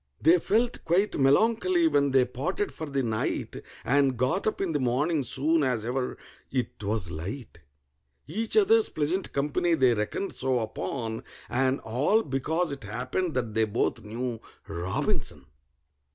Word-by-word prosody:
They 170 +4 +5
felt 230 +7 +1
quite 185 +3 +1
melancholy 185 +4 +3
when 145 -2 +3
they 130 -1 +4
parted 150 +11 -2
for 160 - -6
the 140 -1 -1
night, 110 -2 -2 0.3
And 135 -1 +3
got 130 - 0
up 215 - -1
in 190 -4 -1
the 150 - 0
morning 140 +5 +1
soon 155 +5 +1
as 125 -5 0
ever 125 +1 -2 0.3
it 125 -4 -3
was 100 -4 -1
light; 90 - -6 0.7
Each 220 - 0
other's 435 +1 +5
pleasant 160 +6 -1
company 150 +4 +1
they 130 -5 +4
reckoned 110 - -2
so 130 -1 0
upon, 110 +2 -4 0.3
And 130 +2 +2
all 145 - +2
because 155 +5 -1
it 140 - -6
happened 130 - -2
that 120 -4 -1
they 110 0 +3
both 115 +2 -1
knew 115 +2 -4 0.3
ROBINSON! 85 -4 -2
135 Hz, 150 wpm, -27 LUFS, 115-165 Hz, 0.7 s, They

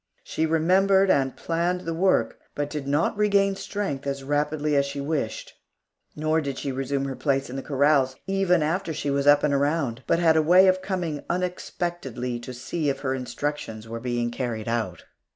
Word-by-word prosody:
She 160 - -1
remembered 190 +4 +4
and 135 -1 +1
planned 170 +2 -1
the 165 -2 -3
work, 185 +3 +1 0.2
but 145 0 -2
did 150 -3 -4
not 145 +9 +1
regain 200 -1 +2
strength 190 -10 -4
as 140 0 -3
rapidly 150 +1 0
as 140 - +4
she 140 0 -5
wished; 140 -5 -3 0.6
nor 155 +1 +1
did 140 -3 -4
she 140 - -3
resume 135 +1 -2
her 135 -1 -4
place 135 -2 -1
in - - -6
the 135 - -3
corrals, 140 -1 +2
even 195 -4 +2
after 165 +1 -1
she 145 - -2
was 140 0 0
up 145 0 +6
and 150 -1 +2
around, 140 -3 0
but - - +3
had 165 -2 +4
a - - +5
way 180 +5 +6
of 185 0 +3
coming 175 -6 -3
unexpectedly 175 -8 -3
to 120 +2 -8
see 145 +5 -2
if 135 - -3
her 130 -2 -1
instructions 130 -4 -4
were 115 +1 -5
being 120 -1 -2
carried 120 -3 -4
out. 115 -7 -2
145 Hz, 190 wpm, -25 LUFS, 135-170 Hz, 0.6 s, up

